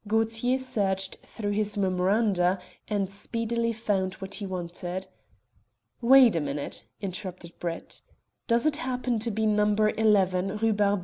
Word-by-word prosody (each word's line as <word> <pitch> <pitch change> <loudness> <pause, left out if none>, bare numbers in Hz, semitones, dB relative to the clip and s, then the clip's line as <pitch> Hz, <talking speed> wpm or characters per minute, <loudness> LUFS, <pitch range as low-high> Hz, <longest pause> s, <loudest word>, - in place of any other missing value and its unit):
Gaultier 225 +3 +2
searched 200 -7 -1
through 205 -3 -5
his 210 0 0
memoranda, 190 0 +2 0.3
and 200 -2 -1
speedily 230 +3 -1
found 200 -4 -1
what 190 -1 -7
he 205 - -4
wanted. 180 0 -4 1.0
"Wait 245 -3 +7
a - - +2
minute," 145 0 -4 0.2
interrupted 185 -3 -6
Brett. 170 -1 -5 0.5
"Does 235 +2 +3
it 305 -1 +2
happen 250 -5 -1
to 230 +2 -1
be 220 0 -1
No. 210 -1 +3
11, 205 -3 +2
Rue 225 0 +2
Barbette?" 205 -1 +2
210 Hz, 135 wpm, -27 LUFS, 190-225 Hz, 1.0 s, Wait